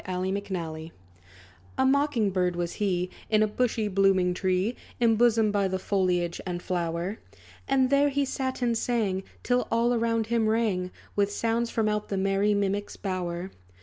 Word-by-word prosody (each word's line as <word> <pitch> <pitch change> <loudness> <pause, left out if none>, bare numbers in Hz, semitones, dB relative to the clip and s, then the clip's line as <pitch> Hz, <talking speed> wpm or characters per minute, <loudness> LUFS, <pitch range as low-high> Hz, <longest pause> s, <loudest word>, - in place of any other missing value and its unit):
=The 185 - -2
Mocking 185 +1 -1
Bird= 170 -5 -4 0.9
A 265 - +3
Mocking 270 -5 +2
Bird 180 -1 0
was 175 0 -2
he, 180 -2 0 0.2
In 215 -1 +4
a - - +2
bushy, 225 0 0
blooming 190 -2 +3
tree, 185 +5 0 0.2
Imbosomed 225 -2 +3
by 200 -1 +2
the 190 0 -1
foliage 180 -3 0
and 180 -2 -3
flower. 175 +2 -2 0.5
And 265 -1 +2
there 285 +1 +4
he 280 0 0
sat 260 -1 -3
and 235 -1 +2
sang, 220 -5 0 0.2
Till 250 0 +1
all 235 +1 +2
around 230 -1 +1
him 225 0 +1
rang, 215 -5 +1 0.3
With 205 0 +2
sounds, 230 +2 0
from 220 -2 0
out 210 0 -1
the 195 - -1
merry 195 +2 +2
mimic's 200 0 -1
bower. 185 -1 -4
205 Hz, 165 wpm, -27 LUFS, 185-230 Hz, 0.9 s, In